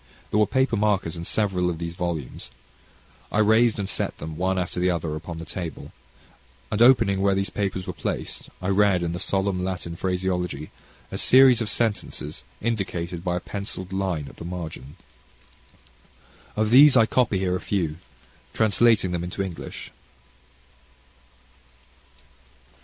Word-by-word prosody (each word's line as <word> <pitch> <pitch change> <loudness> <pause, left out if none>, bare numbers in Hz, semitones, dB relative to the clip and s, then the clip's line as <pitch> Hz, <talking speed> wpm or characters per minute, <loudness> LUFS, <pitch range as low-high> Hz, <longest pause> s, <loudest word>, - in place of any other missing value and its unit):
There 105 - +2
were 105 - +4
paper 130 -3 +1
markers 100 -6 +1
in 85 0 -6
several 95 -4 0
of 85 - -3
these 85 0 -4
volumes, 85 -8 -4 0.8
I - - -1
raised 110 +2 +4
and 100 -2 -2
placed - - -3
them, 80 +1 -7
one 95 +3 0
after 90 -1 -2
the 90 +1 +2
other, 85 -3 -1
upon 80 +1 -7
the 80 - -7
table, 85 -1 -6 0.8
and 105 - 0
opening 115 -6 +5
where 100 0 +3
these 100 0 -1
papers 95 -2 -2
were 90 - -4
placed, 80 - -4
I 90 - 0
read 100 -2 +3
in 85 - -1
the 85 - -4
solemn 95 0 0
Latin 90 -2 -4
phraseology, 90 -4 -2 0.4
a - - -4
series 130 -2 +6
of 110 - -1
sentences 100 -9 -2 0.2
indicated 90 -6 -2
by 90 -2 -1
a - - -4
pencilled 95 -2 -6
line 95 -7 -2
at - - -13
the - - -8
margin. 85 -5 -7 1.6
Of 110 0 0
these 135 +2 +8
I 115 - +6
copy 115 -4 +1
here 95 -1 0
a 90 - -3
few, 85 -6 -1 0.6
translating 110 -3 +3
them 85 -1 -2
into 90 +3 -3
English. 90 -4 -7
95 Hz, 150 wpm, -24 LUFS, 85-105 Hz, 1.6 s, these